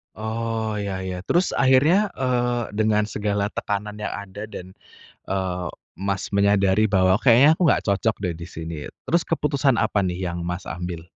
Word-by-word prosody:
Oh, 110 0 -3
iya 100 -2 -3
iya. 95 -1 -4
Terus 180 +2 +2
akhirnya, 140 +10 +4
eee, 120 -2 0
dengan 110 -1 +3
segala 105 -1 -1
tekanan 105 0 -4
yang 105 - -4
ada 100 +1 -7
dan, 95 -3 -10 0.5
eee, 90 -2 -2 0.3
Mas 100 0 -2
menyadari 100 +1 +3
bahwa, 95 0 +3
"Kayaknya 130 +5 +6
aku 180 - -3
nggak - - +2
cocok, 100 +3 +1
deh, 90 - 0
di 85 +1 -8
sini." 80 0 -6 0.3
Terus 170 0 +2
keputusan 145 -4 +1
apa, 110 -2 +1
nih, 90 -2 -1 0.2
yang 85 - -5
Mas 90 +2 -4
ambil? 90 -1 -5
105 Hz, 160 wpm, -23 LUFS, 95-120 Hz, 0.5 s, Kayaknya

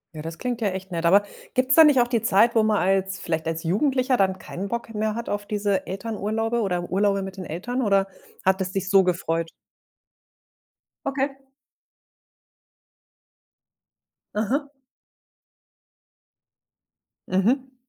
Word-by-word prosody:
Ja, 155 - -6
das 165 +1 -7
klingt 245 -2 -3
ja 215 - +2
echt 190 0 -5
nett. 170 -1 -2
Aber 200 +4 +6 0.3
gibt's 255 +1 +2
da 320 - +9
nicht 295 -4 +5
auch 240 - +3
die 240 -2 0
Zeit, 230 +2 +4
wo 225 - +4
man 215 -1 +2
als 190 +1 +1
vielleicht 160 -1 -2
als 165 0 -3
Jugendlicher 255 - +1
dann 190 -3 +1
kein 190 +1 -6
Bock 235 +1 -4
mehr 215 0 -1
hat 235 0 -5
auf 205 0 -3
diese 205 -2 -1
Elternurlaube, 225 +3 -2
oder 180 -4 -1
Urlaube 195 +1 +2
mit 190 0 -8
den 185 - -6
Eltern, 225 +12 -3
oder 195 -4 +2 0.4
hat 190 +1 +3
es 185 -1 -2
dich 195 0 -3
so 195 -1 +6
gefreut 165 -2 -1 1.6
Okay. 275 0 -1 3.0
Mhm. 260 +8 -1 2.6
Mhm. 255 +8 +1
205 Hz, 140 wpm, -24 LUFS, 190-235 Hz, 3.0 s, da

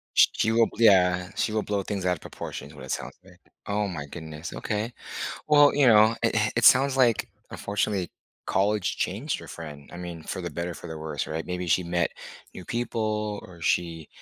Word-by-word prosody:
Sh - - +8
she 110 - +1
will, 115 0 +5
yeah, 90 -5 +5
she - - 0
will 110 0 0
blow 100 -1 -2
things 95 -1 -3
out 90 - +3
of 80 - -15
proportion - - -7
is - - -14
what 65 -2 -9
it 65 - -6
sounds - - -4
like. 90 -1 -18 0.3
Oh 105 0 0
my 80 -6 -5
goodness. 80 +1 -8
Okay. 110 +3 -3 0.5
Well, 145 -1 +6
you 140 -2 +4
know, 110 0 +6
it 115 -1 +1
it 110 0 +2
it 115 - +3
sounds 135 0 +6
like, 120 -4 +3 0.2
unfortunately, 100 -2 -2 0.3
college 100 0 +1
changed 115 +11 -2
your - - -11
friend. 75 -3 -9
I - - -7
mean, 85 -2 -7
for 95 - -4
the 85 - -4
better, 85 +3 -4
for 85 - -9
the 80 -1 -6
worse, 75 -2 -4
right, 80 +1 -4
maybe 90 0 -3
she 90 +2 +3
met 85 0 0 0.4
new 90 - -9
people 110 -3 -2
or 85 -2 -13
she, 80 -1 0
95 Hz, 205 wpm, -26 LUFS, 85-110 Hz, 0.5 s, Sh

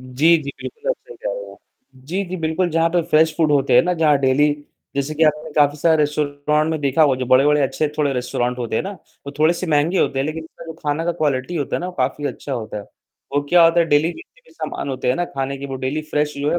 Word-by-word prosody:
जी, 135 +7 +3
जी, 140 - -5
बिल्कुल 455 +1 -7
आप - - +1
सही 475 - -12
कह - - -5
रहे - - -6
हैं। - - -14 0.5
जी, 190 +5 -2
जी, 185 0 -5
बिल्कुल 165 +2 0
जहाँ 165 +1 +2
पे 175 - +2
फ्रेश 155 0 +4
फूड 160 -3 +2
होते 140 -3 +2
हैं 125 - +7
ना 180 - 0
जहाँ 155 -4 +3
डेली 135 +2 +3 0.5
जैसे 140 +2 -1
कि 160 - -1
आपने 155 +1 0
काफ़ी 145 0 +3
सारे 160 +1 +3
रेस्टोरेंट 150 +1 0
में 155 - -2
देखा 140 +2 +2
होगा 145 -3 +4
जो 130 - -2
बड़े-बड़े 145 +4 +4
अच्छे 150 +3 0
थोड़े 145 -2 +2
रेस्टोरेंट 125 0 -2
होते 115 -2 -2
हैं - - 0
ना 195 - -5
वो 145 -5 -13
थोड़े 155 +2 +4
से 180 - -4
महंगे 160 +4 +2
होते 135 - +1
हैं 135 - 0
लेकिन 160 +1 -5 0.2
जो 165 - -6
खाना 150 +2 -1
का 175 - 0
क्वालिटी 150 0 -1
होता 145 - -1
है - - -4
ना 175 - -3
वो 180 - -6
काफ़ी 135 +3 -1
अच्छा 140 - -5
होता 110 -4 -4
है। - - -7 0.5
वो 145 - +2
क्या 175 -1 +6
होता 165 +1 +4
है 165 - +2
डेली 155 +2 +2
जितने 435 +8 -15
भी - - -20
सामान 140 - -5
होते 130 -2 -3
हैं 125 - +3
ना 175 - 0
खाने 135 0 -2
के 140 - -6
वो 135 - -6
डेली 150 +4 -2
फ्रेश 150 0 0
जो 145 +1 0
है 175 - +1
150 Hz, 270 wpm, -20 LUFS, 140-165 Hz, 0.5 s, हैं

